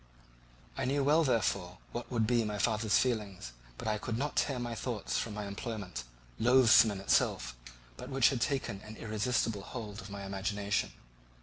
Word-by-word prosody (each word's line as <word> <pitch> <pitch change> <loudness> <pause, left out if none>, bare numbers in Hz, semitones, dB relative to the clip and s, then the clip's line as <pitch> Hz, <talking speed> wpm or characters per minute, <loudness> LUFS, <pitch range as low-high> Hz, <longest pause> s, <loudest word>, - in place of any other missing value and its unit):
I - - -2
knew 140 +2 +1
well 150 +4 +4
therefore 115 - 0
what 120 - -5
would 115 -3 +2
be 120 +1 +2
my 105 -1 -3
father's 110 0 +2
feelings, 105 - -1 0.3
but - - -6
I 105 -1 0
could 115 +1 -3
not 145 +3 -2
tear 135 -3 +1
my 120 -1 -3
thoughts 115 -2 -2
from 110 -3 -4
my 105 -1 -4
employment, 100 - -5 0.3
loathsome 120 -2 +7
in 100 -2 -4
itself, - - +1 0.4
but - - -8
which 135 -1 +4
had 130 -4 -2
taken 120 -8 -1
an 110 +1 -10
irresistible 110 -1 0
hold 105 -1 -7
of 100 - -10
my 100 0 -6
imagination. 100 +1 -1
110 Hz, 175 wpm, -32 LUFS, 100-125 Hz, 0.4 s, loathsome